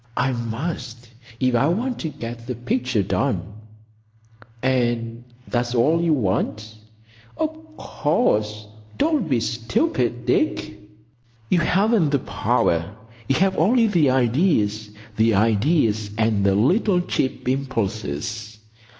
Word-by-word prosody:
"I 130 Hz, +1 st, +2 dB
must, 120 Hz, 0 st, -5 dB, 0.3 s
if 130 Hz, -1 st, +1 dB
I 120 Hz, +4 st, +3 dB
want 235 Hz, +9 st, -1 dB
to 160 Hz, -, -3 dB
get 120 Hz, -4 st, -8 dB
the 125 Hz, -, -3 dB
picture 120 Hz, -2 st, -1 dB
done." 90 Hz, -1 st, 0 dB, 1.2 s
"And 120 Hz, -2 st, 0 dB, 0.2 s
that's 120 Hz, 0 st, -1 dB
all 155 Hz, +8 st, +3 dB
you 170 Hz, -1 st, +1 dB
want?" 110 Hz, -2 st, -1 dB, 0.6 s
"Of 315 Hz, 0 st, -5 dB
course. 105 Hz, -8 st, 0 dB, 0.3 s
Don't 295 Hz, -, +1 dB
be 130 Hz, -4 st, +2 dB
stupid, 120 Hz, -, -1 dB
Dick." 325 Hz, -, 0 dB, 0.8 s
"You 180 Hz, -, +4 dB
haven't 195 Hz, 0 st, +2 dB
the 140 Hz, -, +2 dB
power. 85 Hz, -6 st, 0 dB, 0.3 s
You 135 Hz, -, +3 dB
have 190 Hz, +5 st, +2 dB
only 230 Hz, +8 st, +4 dB
the 170 Hz, -10 st, +3 dB
ideas—the 110 Hz, -, +1 dB
ideas 110 Hz, -, +2 dB
and 110 Hz, -3 st, +1 dB
the 95 Hz, -, +3 dB
little 180 Hz, -, +3 dB
cheap 130 Hz, -7 st, -2 dB
impulses. 110 Hz, -, -3 dB
125 Hz, 115 wpm, -22 LUFS, 110-165 Hz, 1.2 s, You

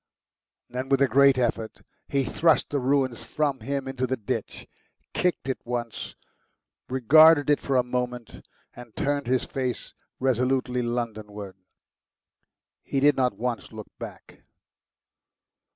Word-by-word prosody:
Then 130 Hz, +2 st, -5 dB
with 135 Hz, -1 st, +3 dB
a -, -, +4 dB
great 140 Hz, +2 st, +5 dB
effort 115 Hz, -3 st, -2 dB, 0.2 s
he 140 Hz, -1 st, 0 dB
thrust 160 Hz, +2 st, +2 dB
the 145 Hz, -, 0 dB
ruins 130 Hz, -2 st, 0 dB
from 145 Hz, -3 st, -1 dB
him 135 Hz, +3 st, -3 dB
into 130 Hz, -1 st, -2 dB
the 130 Hz, +1 st, -1 dB
ditch, 105 Hz, -, -5 dB, 0.5 s
kicked 180 Hz, -6 st, 0 dB
at 130 Hz, -, -2 dB
it -, -, -59 dB
once, 120 Hz, -2 st, -5 dB, 0.7 s
regarded 145 Hz, +4 st, +6 dB
it 145 Hz, -, +3 dB
for 135 Hz, -, -1 dB
a 125 Hz, -, +4 dB
moment, 125 Hz, -, -4 dB, 0.3 s
and 120 Hz, -3 st, -12 dB
turned 145 Hz, -2 st, -1 dB
his 130 Hz, 0 st, +1 dB
face 130 Hz, -2 st, -4 dB, 0.3 s
resolutely 125 Hz, 0 st, +1 dB
Londonward. 110 Hz, -4 st, -4 dB, 1.3 s
He 135 Hz, -, -2 dB
did 145 Hz, +2 st, +5 dB
not 125 Hz, -2 st, 0 dB
once 120 Hz, 0 st, -3 dB
look 110 Hz, -2 st, -10 dB
back. -, -, -10 dB
130 Hz, 135 wpm, -26 LUFS, 120-140 Hz, 1.3 s, regarded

